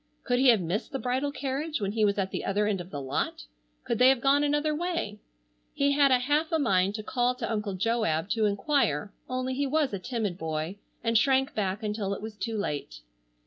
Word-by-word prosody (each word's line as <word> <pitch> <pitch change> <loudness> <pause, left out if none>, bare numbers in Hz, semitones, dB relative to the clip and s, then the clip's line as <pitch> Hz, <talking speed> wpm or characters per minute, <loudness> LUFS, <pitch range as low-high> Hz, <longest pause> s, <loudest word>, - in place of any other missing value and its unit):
Could 245 -1 +1
he 265 - +4
have 230 -5 +6
missed 175 - -2
the 270 - -2
bridal 260 +2 -1
carriage 285 +2 -3
when 200 -2 -1
he 220 0 0
was 200 -1 +2
at 190 -1 -1
the - - -3
other 205 +2 +1
end 205 -3 0
of 175 - -10
the 145 - -5
lot? 130 - -3 0.4
Could - - -2
they 250 +1 +7
have 265 -2 +3
gone 280 +3 +3
another 295 +1 +1
way? 335 - -2 0.6
He 280 0 +2
had 280 0 +4
a 255 - +5
half 295 +5 0
a 325 - +3
mind 195 -8 +2
to 215 - -5
call 245 +2 0
to 240 -2 -4
Uncle 210 -3 -2
Joab 190 -6 0
to 220 -1 +2
enquire 200 - 0 0.2
only 255 0 -2
he 280 +2 0
was 290 -3 +1
a 200 - -2
timid 205 -3 -3
boy 160 +3 -3 0.3
and 230 0 +1
shrank 265 +3 +3
back 200 +1 -2
until 210 -2 -2
it - - -9
was 220 -1 -6
too 225 +1 -3
late. 145 - -4
225 Hz, 225 wpm, -28 LUFS, 200-270 Hz, 0.6 s, they